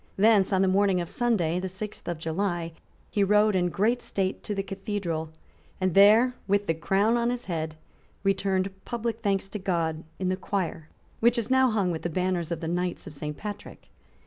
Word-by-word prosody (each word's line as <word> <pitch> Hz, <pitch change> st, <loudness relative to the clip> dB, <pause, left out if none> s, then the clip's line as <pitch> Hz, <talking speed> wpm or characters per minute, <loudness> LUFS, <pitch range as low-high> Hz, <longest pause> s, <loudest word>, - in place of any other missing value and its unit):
Thence, 210 Hz, -1 st, +4 dB
on 190 Hz, 0 st, +3 dB
the -, -, +3 dB
morning 195 Hz, 0 st, +3 dB
of 170 Hz, -1 st, -4 dB
Sunday, 185 Hz, -9 st, +1 dB
the 190 Hz, -, -3 dB
sixth 190 Hz, +3 st, -7 dB
of 175 Hz, -1 st, -2 dB
July, 170 Hz, +1 st, -2 dB, 0.4 s
he 205 Hz, -, +2 dB
rode 210 Hz, +1 st, +4 dB
in 180 Hz, -1 st, +2 dB
great 225 Hz, +8 st, +1 dB
state 190 Hz, -1 st, -2 dB
to 210 Hz, -, -4 dB
the 195 Hz, -, -1 dB
cathedral, 195 Hz, -5 st, -3 dB, 0.5 s
and 185 Hz, -2 st, +1 dB
there, 215 Hz, +6 st, +6 dB
with 200 Hz, +1 st, +2 dB
the 165 Hz, -, +1 dB
crown 200 Hz, +8 st, +2 dB
on 235 Hz, 0 st, +1 dB
his 245 Hz, 0 st, -3 dB
head, 160 Hz, -3 st, -3 dB, 0.5 s
returned 195 Hz, -1 st, +1 dB
public 235 Hz, -1 st, -3 dB
thanks 195 Hz, -3 st, 0 dB
to 210 Hz, -, -5 dB
God 165 Hz, -4 st, -1 dB
in 185 Hz, -1 st, -1 dB
the 185 Hz, -, +1 dB
choir 175 Hz, -5 st, -3 dB, 0.3 s
which 235 Hz, +2 st, +4 dB
is 235 Hz, +2 st, -2 dB
now 260 Hz, 0 st, +5 dB
hung 200 Hz, -5 st, +1 dB
with 160 Hz, -, -3 dB
the 175 Hz, -, -2 dB
banners 180 Hz, -1 st, -1 dB
of 170 Hz, -, -3 dB
the 165 Hz, -, -3 dB
Knights 175 Hz, +1 st, -2 dB
of 165 Hz, -, -9 dB
Saint 150 Hz, +1 st, -5 dB
Patrick. 210 Hz, -1 st, -8 dB
195 Hz, 200 wpm, -27 LUFS, 175-210 Hz, 0.5 s, there